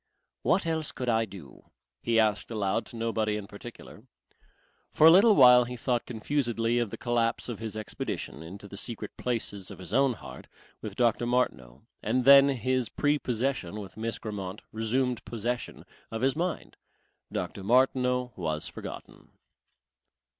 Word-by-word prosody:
"What 195 Hz, -, +2 dB
else 160 Hz, -2 st, -1 dB
could 125 Hz, -1 st, -4 dB
I 115 Hz, -1 st, +2 dB
do?" 95 Hz, -, -13 dB, 0.3 s
he 115 Hz, -1 st, +2 dB
asked 105 Hz, -2 st, +1 dB
aloud 105 Hz, 0 st, -1 dB
to -, -, -11 dB
nobody 110 Hz, -2 st, -1 dB
in 105 Hz, -, -6 dB
particular. 110 Hz, +2 st, -12 dB, 0.8 s
For 155 Hz, -, +4 dB
a 165 Hz, -, +10 dB
little 205 Hz, +5 st, +7 dB
while 125 Hz, -2 st, +8 dB
he 125 Hz, +1 st, -6 dB
thought 120 Hz, 0 st, -1 dB
confusedly 120 Hz, -1 st, 0 dB
of 120 Hz, -3 st, -1 dB
the -, -, -7 dB
collapse 120 Hz, -1 st, 0 dB
of 120 Hz, -, -5 dB
his 110 Hz, -1 st, -5 dB
expedition 105 Hz, -7 st, -5 dB
into 95 Hz, +5 st, -10 dB
the 100 Hz, -, -9 dB
secret 115 Hz, +2 st, -5 dB
places 105 Hz, -6 st, -3 dB
of 100 Hz, -, -9 dB
his 95 Hz, +1 st, -8 dB
own 135 Hz, 0 st, +4 dB
heart -, -, -11 dB, 0.3 s
with 105 Hz, -3 st, -6 dB
Dr. 120 Hz, 0 st, +2 dB
Martineau, 65 Hz, -, -1 dB, 0.2 s
and 130 Hz, 0 st, 0 dB
then 140 Hz, +1 st, +8 dB
his 130 Hz, -2 st, 0 dB
prepossession 130 Hz, -, -1 dB
with 100 Hz, -2 st, -9 dB
Miss 115 Hz, +1 st, -3 dB
Grammont 100 Hz, -2 st, -6 dB
resumed 120 Hz, +2 st, -1 dB
possession 120 Hz, +2 st, -4 dB, 0.2 s
of 115 Hz, -, -5 dB
his 135 Hz, +1 st, +2 dB
mind. 175 Hz, +1 st, -3 dB, 0.5 s
Dr. 95 Hz, -, -4 dB
Martineau 125 Hz, +1 st, +2 dB
was 80 Hz, -4 st, -3 dB
forgotten. -, -, -9 dB
115 Hz, 155 wpm, -28 LUFS, 105-125 Hz, 0.8 s, a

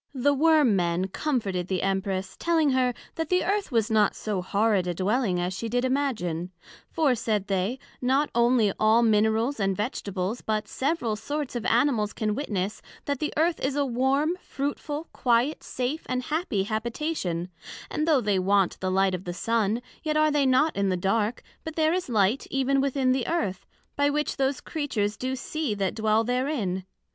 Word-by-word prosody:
The 285 Hz, +3 st, +3 dB
Worm 300 Hz, -5 st, +4 dB
men 175 Hz, +1 st, 0 dB
comforted 195 Hz, -, -1 dB
the 185 Hz, -2 st, -1 dB
Empress, 195 Hz, 0 st, -1 dB
telling 325 Hz, -4 st, +2 dB
her, 255 Hz, -2 st, +2 dB, 0.2 s
That 325 Hz, -1 st, -3 dB
the 365 Hz, 0 st, +2 dB
Earth 405 Hz, -4 st, 0 dB
was 225 Hz, -1 st, +1 dB
not 215 Hz, -2 st, +3 dB
so 205 Hz, -4 st, -2 dB
horrid 200 Hz, 0 st, +1 dB
a 175 Hz, -, -1 dB
Dwelling, 195 Hz, 0 st, +1 dB
as 180 Hz, +1 st, -1 dB
she 225 Hz, +5 st, -4 dB
did 245 Hz, +2 st, 0 dB
imagine; 225 Hz, -, -1 dB, 0.4 s
for, 305 Hz, -5 st, +2 dB
said 220 Hz, -4 st, -1 dB
they, 195 Hz, +5 st, -1 dB, 0.2 s
not 270 Hz, +4 st, +2 dB
onely 235 Hz, -3 st, +3 dB
all 220 Hz, +2 st, +4 dB
Minerals 220 Hz, +4 st, +2 dB
and 195 Hz, -2 st, 0 dB
Vegetables, 205 Hz, -1 st, -3 dB
but 215 Hz, -1 st, -2 dB
several 265 Hz, -6 st, -1 dB
sorts 285 Hz, +5 st, -4 dB
of 235 Hz, -, -2 dB
Animals 235 Hz, -3 st, +2 dB
can 215 Hz, -1 st, -1 dB
witness, 210 Hz, -6 st, -3 dB, 0.2 s
that 285 Hz, -2 st, -1 dB
the 300 Hz, -, -1 dB
Earth 330 Hz, +2 st, +2 dB
is 270 Hz, +1 st, -1 dB
a 285 Hz, -1 st, +1 dB
warm, 270 Hz, +6 st, +1 dB
fruitful, 290 Hz, +3 st, -4 dB
quiet, 245 Hz, +4 st, +1 dB
safe, 260 Hz, +6 st, -3 dB
and 255 Hz, 0 st, -1 dB
happy 300 Hz, -, -1 dB
habitation; 215 Hz, -, -2 dB, 0.4 s
and 305 Hz, -, -1 dB
though 300 Hz, -5 st, +4 dB
they 205 Hz, -3 st, +1 dB
want 195 Hz, 0 st, +2 dB
the 185 Hz, -, -1 dB
light 190 Hz, 0 st, +2 dB
of 185 Hz, +1 st, -4 dB
the 175 Hz, -1 st, -4 dB
Sun, 225 Hz, +2 st, 0 dB, 0.2 s
yet 305 Hz, -1 st, 0 dB
are 310 Hz, 0 st, +4 dB
they 290 Hz, -2 st, +2 dB
not 280 Hz, +5 st, +3 dB
in 200 Hz, -1 st, +1 dB
the 185 Hz, -, 0 dB
dark, 210 Hz, +5 st, 0 dB, 0.2 s
but 320 Hz, -1 st, -6 dB
there 315 Hz, 0 st, +2 dB
is 365 Hz, -5 st, -2 dB
light 215 Hz, +2 st, +2 dB
even 270 Hz, 0 st, +1 dB
within 270 Hz, -1 st, +1 dB
the 255 Hz, -1 st, 0 dB
Earth, 305 Hz, -, -2 dB, 0.3 s
by 285 Hz, 0 st, +2 dB
which 300 Hz, +1 st, -1 dB
those 270 Hz, 0 st, 0 dB
Creatures 225 Hz, -10 st, -2 dB
do 255 Hz, +4 st, -3 dB
see 275 Hz, -2 st, -3 dB
that 195 Hz, -2 st, -1 dB
dwell 220 Hz, 0 st, +2 dB
therein. 245 Hz, -7 st, -1 dB
235 Hz, 180 wpm, -26 LUFS, 200-285 Hz, 0.4 s, Worm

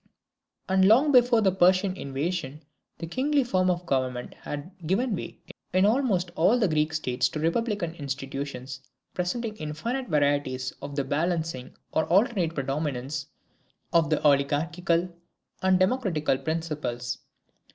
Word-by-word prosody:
And 190 Hz, 0 st, +4 dB
long 255 Hz, +9 st, +5 dB
before 245 Hz, -3 st, +5 dB
the 195 Hz, -3 st, +4 dB
Persian 185 Hz, +1 st, +3 dB
invasion 150 Hz, 0 st, -3 dB, 0.3 s
the -, -, -5 dB
kingly 275 Hz, -, +1 dB
form 185 Hz, -6 st, +1 dB
of 175 Hz, 0 st, -1 dB
government 130 Hz, -4 st, -1 dB
had 145 Hz, +5 st, -7 dB, 0.2 s
given 215 Hz, +5 st, +1 dB
way -, -, -7 dB, 0.4 s
in 185 Hz, +1 st, +4 dB
almost 210 Hz, -7 st, +1 dB
all 190 Hz, +9 st, +4 dB
the 220 Hz, -4 st, +2 dB
Greek 155 Hz, -1 st, +1 dB
states 130 Hz, -5 st, 0 dB
to 155 Hz, -, -5 dB
republican 180 Hz, +1 st, 0 dB
institutions, 135 Hz, -3 st, -5 dB, 0.3 s
presenting 215 Hz, +5 st, -2 dB
infinite 230 Hz, -, -3 dB
varieties 145 Hz, -5 st, 0 dB
of 140 Hz, 0 st, -6 dB
the 140 Hz, -, 0 dB
balancing 155 Hz, -2 st, -2 dB, 0.2 s
or 160 Hz, -, +1 dB
the -, -, -16 dB
alternate 190 Hz, -3 st, +2 dB
predominance 135 Hz, 0 st, -3 dB, 0.7 s
of 165 Hz, -3 st, +4 dB
the -, -, +2 dB
oligarchical 155 Hz, +5 st, +2 dB, 0.5 s
and 190 Hz, 0 st, +4 dB
democratical 185 Hz, -, +1 dB
principles. 150 Hz, -7 st, -3 dB
165 Hz, 130 wpm, -27 LUFS, 145-190 Hz, 0.7 s, long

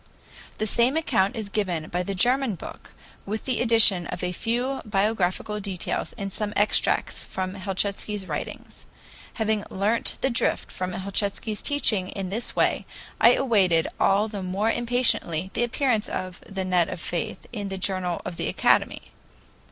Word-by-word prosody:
The 215 Hz, -, -1 dB
same 240 Hz, +7 st, +3 dB
account 235 Hz, -8 st, +2 dB
is 220 Hz, -3 st, -3 dB
given 180 Hz, -7 st, -1 dB
by 180 Hz, -, -1 dB
the 195 Hz, +2 st, -3 dB
German 245 Hz, +2 st, +2 dB
book, -, -, -10 dB, 0.3 s
with 215 Hz, +2 st, -4 dB
the 255 Hz, -2 st, 0 dB
addition 225 Hz, -7 st, +5 dB
of -, -, -5 dB
a 180 Hz, -, 0 dB
few 240 Hz, +8 st, -1 dB
biographical 210 Hz, -1 st, 0 dB
details 195 Hz, -3 st, -3 dB
and 200 Hz, -2 st, -4 dB
some 210 Hz, -1 st, -1 dB
extracts 205 Hz, +1 st, +1 dB
from 185 Hz, 0 st, -4 dB
Helchitsky's 200 Hz, +1 st, -2 dB
writings. -, -, -6 dB, 0.5 s
Having 220 Hz, -2 st, 0 dB
learnt 210 Hz, +4 st, 0 dB
the 265 Hz, -, +2 dB
drift 235 Hz, -, 0 dB
of 185 Hz, -1 st, -3 dB
Helchitsky's 200 Hz, +3 st, -2 dB
teaching 220 Hz, -10 st, +1 dB
in 195 Hz, -2 st, -4 dB
this 225 Hz, +4 st, -3 dB
way, -, -, +1 dB, 0.3 s
I -, -, +7 dB
awaited 190 Hz, -10 st, +3 dB
all 200 Hz, +2 st, +3 dB
the 210 Hz, -2 st, -5 dB
more 195 Hz, +4 st, 0 dB
impatiently 230 Hz, -8 st, +1 dB
the -, -, 0 dB
appearance 240 Hz, -2 st, +1 dB
of 185 Hz, -1 st, -5 dB
"The 195 Hz, -1 st, -3 dB
Net 180 Hz, -2 st, +2 dB
of -, -, -5 dB
Faith" 170 Hz, -1 st, -4 dB
in 205 Hz, -3 st, -3 dB
the 195 Hz, -1 st, -4 dB
journal 185 Hz, -2 st, -1 dB
of 170 Hz, -, -5 dB
the -, -, -2 dB
Academy. -, -, +2 dB
200 Hz, 160 wpm, -25 LUFS, 185-225 Hz, 0.5 s, I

